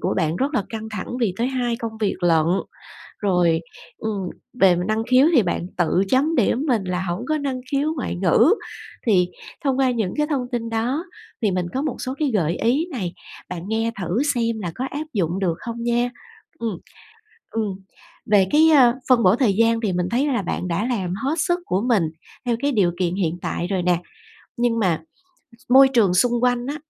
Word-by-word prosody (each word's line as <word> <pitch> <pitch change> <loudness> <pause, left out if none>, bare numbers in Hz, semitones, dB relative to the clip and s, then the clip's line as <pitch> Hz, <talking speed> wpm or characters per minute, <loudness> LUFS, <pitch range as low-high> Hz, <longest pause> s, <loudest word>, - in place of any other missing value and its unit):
của - - -1
bạn 165 -2 0
rất 280 +3 -1
là 205 - +2
căng 220 -1 -6
thẳng 205 -3 -5
vì 200 -6 +1
tới 235 - +1
hai 245 -3 -1
công 230 -2 -5
việc 205 -3 +1
lận, 165 -2 +3 0.7
rồi, 175 -5 +2 0.4
ừm, 205 -4 -3 0.3
về 185 -2 +6
năng 220 +1 0
khiếu 260 +4 +6
thì 235 - +6
bạn 175 0 -2
tự 180 +2 +2
chấm 290 +5 +2
điểm 240 +4 +2
mình 230 -7 +2
là 180 0 -2
hổng 185 +5 -3
có 310 - +2
năng 270 -3 -3
khiếu 290 +3 +1
ngoại 260 - -3
ngữ 190 - +4 0.5
thì 180 -5 +3 0.4
thông 270 -1 +1
qua 260 -2 +3
những 220 -6 -1
cái 300 0 +1
thông 275 -5 -1
tin 230 -1 -2
đó 245 +9 -1 0.4
thì 210 -3 +2
mình 180 -1 -1
có 265 - -1
một 295 -4 -2
số 255 - -3
cái 295 -4 +1
gợi 170 -3 +1
ý 275 +9 +1
này, 190 - -3 0.4
bạn 175 -2 -5
nghe 225 +1 0
thử 190 +9 0
xem 230 -2 0
là 175 -4 -4
có 260 - -3
áp 300 +2 -4
dụng 180 -1 0
được 175 -4 0
không 235 0 -6
nha. 240 +1 +1 0.5
Ừm. 225 -6 -3 0.7
Ừm. 220 -2 -1 0.6
Về 195 -3 +5
cái, 315 +2 +6
ơ, 255 -6 +6 0.2
phân 240 -3 +5
bổ 185 +4 +5
thời 240 -6 +2
gian 230 +2 +2
thì 200 -5 0
mình 180 0 0
thấy 265 +5 +1
là 255 -6 0
bạn 180 0 -3
đã 185 +6 -1
làm 195 -8 -1
hết 290 +4 0
sức 350 +2 +1
của 190 +2 0
mình 215 -7 +4 0.4
theo 240 -1 +1
cái 285 0 +1
điều 195 -7 +2
kiện 180 -1 0
hiện 175 -3 -1
tại 175 - -2
rồi 185 -2 -1
nè, 175 -1 +3 0.6
nhưng 235 -1 +1
mà 175 -7 +1 0.7
môi 270 +1 +8
trường 225 -9 +3
xung 240 +7 +3
quanh 245 -1 +1
á, 285 +2 -3
225 Hz, 205 wpm, -22 LUFS, 185-255 Hz, 0.7 s, môi